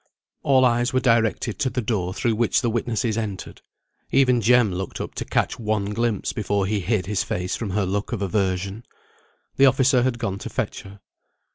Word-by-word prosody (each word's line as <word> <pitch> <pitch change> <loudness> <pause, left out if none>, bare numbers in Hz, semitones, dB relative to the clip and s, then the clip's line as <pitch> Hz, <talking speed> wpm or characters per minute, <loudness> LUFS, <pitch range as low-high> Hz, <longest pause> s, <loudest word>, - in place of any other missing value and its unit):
All 130 -2 +4
eyes 120 0 +1
were 130 - +3
directed 115 -2 +1
to 135 -3 +1
the 130 - -3
door 105 -6 -1
through 115 +4 0
which 115 +1 +1
the 120 -3 0
witnesses 115 -1 -1
entered. 105 -4 -6 0.5
Even 125 -3 +3
Jem 120 -3 +4
looked 95 +1 -5
up - - -5
to - - -5
catch 115 - -1
one 105 -2 -1
glimpse 115 -1 -1
before 100 -2 -1
he 105 +1 0
hid 100 -1 -1
his 100 0 -1
face 90 +1 -3
from 110 - -4
her 100 +1 0
look 100 +5 -2
of 110 -4 -2
aversion. 95 +2 -1 0.7
The 135 - +7
officer 130 0 +4
had 125 -1 0
gone 105 -5 -3
to - - -6
fetch - - -3
her. 100 0 -14
110 Hz, 190 wpm, -23 LUFS, 100-120 Hz, 0.7 s, The